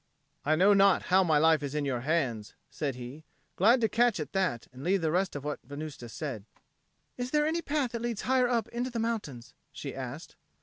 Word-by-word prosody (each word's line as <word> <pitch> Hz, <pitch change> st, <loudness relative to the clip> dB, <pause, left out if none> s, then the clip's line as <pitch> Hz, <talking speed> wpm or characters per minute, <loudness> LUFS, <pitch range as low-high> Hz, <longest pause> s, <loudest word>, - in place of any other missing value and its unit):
"I 155 Hz, +3 st, +2 dB
know 190 Hz, +5 st, +5 dB
not 195 Hz, -1 st, +5 dB
how 190 Hz, 0 st, +7 dB
my 160 Hz, -4 st, +3 dB
life 160 Hz, 0 st, +4 dB
is 145 Hz, 0 st, -4 dB
in 150 Hz, -1 st, 0 dB
your 130 Hz, -3 st, -1 dB
hands," 125 Hz, -7 st, -1 dB, 0.2 s
said 140 Hz, -4 st, -3 dB
he, 125 Hz, +5 st, -9 dB, 0.3 s
glad 235 Hz, +7 st, +4 dB
to 225 Hz, -, +4 dB
catch 235 Hz, -3 st, +2 dB
at 150 Hz, -, -5 dB
that 185 Hz, -, 0 dB
and 130 Hz, +2 st, -10 dB
leave 190 Hz, +2 st, +2 dB
the 160 Hz, -1 st, +1 dB
rest 185 Hz, +1 st, 0 dB
of 145 Hz, -, -5 dB
what 150 Hz, 0 st, -3 dB
Venusta 145 Hz, -2 st, -7 dB
said. 120 Hz, -6 st, -5 dB, 0.7 s
"Is 245 Hz, 0 st, -3 dB
there 300 Hz, +2 st, +2 dB
any 325 Hz, +2 st, 0 dB
path 285 Hz, -6 st, -1 dB
that 235 Hz, -2 st, -4 dB
leads 235 Hz, -3 st, -3 dB
higher 255 Hz, -1 st, +2 dB
up 230 Hz, -3 st, +1 dB
into 245 Hz, +2 st, -3 dB
the 240 Hz, -, -5 dB
mountains?" 205 Hz, -, -3 dB, 0.2 s
she -, -, -6 dB
asked. -, -, -7 dB
170 Hz, 215 wpm, -29 LUFS, 145-235 Hz, 0.7 s, how